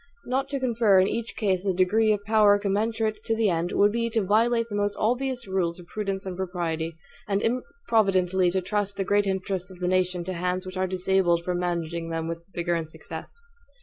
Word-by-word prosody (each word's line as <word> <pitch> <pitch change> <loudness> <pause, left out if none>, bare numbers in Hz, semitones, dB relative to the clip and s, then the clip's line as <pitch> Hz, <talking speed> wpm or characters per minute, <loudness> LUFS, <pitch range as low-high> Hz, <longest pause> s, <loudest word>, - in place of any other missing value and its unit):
Not 265 +2 -1
to 275 -1 -2
confer 230 -6 +3
in 185 - +4
each 230 +1 -3
case 190 -4 0
a 190 -2 0
degree 215 +4 +3
of 205 -1 0
power 210 -1 +5
commensurate 215 +2 -1
to 225 - +1
the 220 -3 +2
end, 170 +1 -1
would 205 +1 +4
be 230 +1 -1
to 225 -2 0
violate 230 +4 +2
the 205 - -5
most 205 0 0
obvious 250 +2 0
rules 180 -3 0
of 175 - -12
prudence 195 0 -4
and 185 -1 -4
propriety, 170 -3 -3 0.3
and 200 -1 +1
improvidently 195 - +1
to 190 +2 0
trust 205 +1 -2
the 195 - 0
great 205 +1 +2
interests 190 -1 -2
of 185 - -12
the 180 - -1
nation 180 -1 +1
to 185 +2 -4
hands 180 +1 -2
which 185 0 -7
are 185 0 0
disabled 185 -2 +1
from 180 0 -1
managing 170 -1 -2
them 165 0 -2
with 165 0 -4
vigor 175 -1 -1
and 165 -2 -2
success. 465 - -9
190 Hz, 210 wpm, -26 LUFS, 180-220 Hz, 0.3 s, power